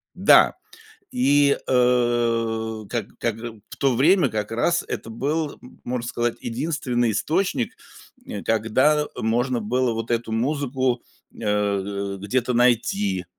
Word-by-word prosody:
Да, - - +6 0.6
и, 145 - +3
э, 115 -3 +1
как 120 -2 -2
как 115 -2 -1
э 115 -3 -8
в - - -9
то 135 -2 +2
время 160 +4 +4
как 105 -2 -3
раз 170 +10 +1
это - - -5
был, 145 +6 -2 0.3
можно 120 -1 -3
сказать, 120 -1 -1
единственный 120 -2 -1
источник, 155 - -1 0.5
э, 100 - -6
когда 130 +8 +2
можно 120 +2 0
было 120 +2 0
вот 115 +1 -5
эту 115 -1 -1
музыку, 130 0 0 0.3
э, 100 -2 -1
где-то 125 +5 -1
найти. 115 -6 +1
120 Hz, 120 wpm, -23 LUFS, 110-130 Hz, 0.6 s, Да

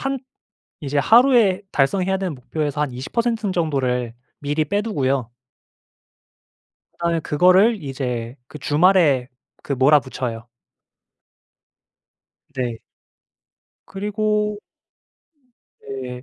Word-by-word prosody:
한 270 0 -1 0.6
이제 145 -2 -3
하루에 225 - +5
달성해야 185 +7 +1
되는 190 -5 -3
목표에서 145 +3 -4
한 150 - 0
20% 220 - -2
정도를 130 -8 -1 0.3
미리 150 +2 -1
빼 200 +7 -1
두고요. 135 - -1 1.6
그다음에 170 -1 -1
그거를 185 +7 +3
이제 125 -3 -4
그 150 - -10
주말에 150 -4 +3 0.3
그 - - -4
몰아붙여요. 130 -4 +1 2.1
네. 120 -4 -3 1.1
그리고 210 +1 -1 1.2
네. 125 -2 -7
150 Hz, 185 characters per minute, -21 LUFS, 130-195 Hz, 2.1 s, 하루에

